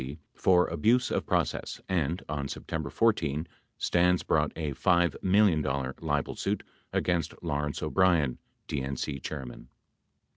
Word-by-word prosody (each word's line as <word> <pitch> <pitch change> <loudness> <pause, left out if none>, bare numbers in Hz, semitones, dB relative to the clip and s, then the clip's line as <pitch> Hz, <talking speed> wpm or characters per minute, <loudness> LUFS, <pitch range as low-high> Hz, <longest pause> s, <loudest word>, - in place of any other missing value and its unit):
75 65 +3 -6 0.2
for 90 -1 +5
abuse 115 +10 +2
of - - -1
process - - -1
and, 85 -2 0
on 70 -2 -3
September 80 +3 -4
14, 80 -9 +1 0.3
Stans 90 0 +2
brought 75 -1 +2
a 75 -3 -2
$5 85 -1 +2
million 95 -4 +4 0.4
libel 75 -3 -1
suit - - -2 0.3
against 85 -3 0
Lawrence 75 -3 -2
O'Brien, 85 -9 +2 0.3
DNC 70 0 -3
chairman. 65 -4 -7
80 Hz, 120 wpm, -29 LUFS, 70-90 Hz, 0.4 s, for